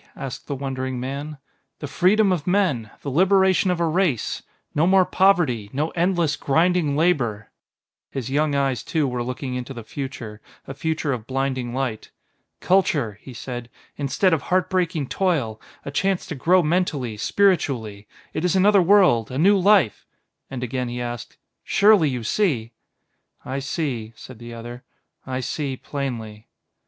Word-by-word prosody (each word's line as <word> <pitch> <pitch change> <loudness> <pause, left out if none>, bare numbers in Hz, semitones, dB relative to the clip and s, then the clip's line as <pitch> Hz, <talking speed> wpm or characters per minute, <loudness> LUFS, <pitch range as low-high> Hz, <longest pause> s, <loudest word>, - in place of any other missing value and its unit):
asked 135 - -7
the 140 - -3
wondering 130 -1 -3
man. 140 +4 -5 0.4
"The - - -6
freedom 195 +7 +3
of 175 -4 -1
men 180 - +1
the 140 - -3
liberation 190 +4 +3
of 180 -1 0
a 170 - +2
race. 165 - 0 0.3
No 160 +3 +2
more 190 0 +5
poverty, 165 - +2
no 150 +4 -1
endless, 170 -3 +1
grinding 160 0 +1
labor." 120 -11 0 0.6
His 130 -4 -5
young 145 +2 +1
eyes, 135 -3 0
too, 155 -4 0
were 125 -1 -2
looking 125 +1 -4
into 125 +1 -5
the 115 - -7
future, 115 -4 -7 0.2
a 135 - -7
future 155 0 -1
of 115 -2 -6
blinding 130 -2 -2
light. 130 -5 -3 0.5
"Culture," 145 - +1
he 130 - -10
said, 120 0 -7 0.3
"instead 145 +6 +1
of 160 - +1
heart 185 +5 0
breaking 175 -5 0
toil, 135 - -1 0.2
a 140 - -4
chance 190 +5 0
to 185 - -5
grow 175 +6 +3
mentally, 150 -8 0
spiritually; 115 - 0 0.3
it 155 - -3
is 180 +1 +1
another 200 +1 +5
world, 180 - +4
a 130 - -5
new 195 +7 +5
life 195 - +3 0.2
" - - -56
And 130 -2 -5
again 125 0 -2
he 120 +1 -4
asked: 120 -1 -6 0.3
"Surely, 200 -7 +4
you 125 -3 -3
see?" 120 - 0 0.7
"I 135 +1 -3
see," 130 -6 -3
said 125 +1 -12
the 120 0 -9
other; 120 +2 -8 0.4
"I 130 0 -2
see 135 +1 -3
plainly." 115 -7 -5
140 Hz, 160 wpm, -23 LUFS, 125-180 Hz, 0.7 s, more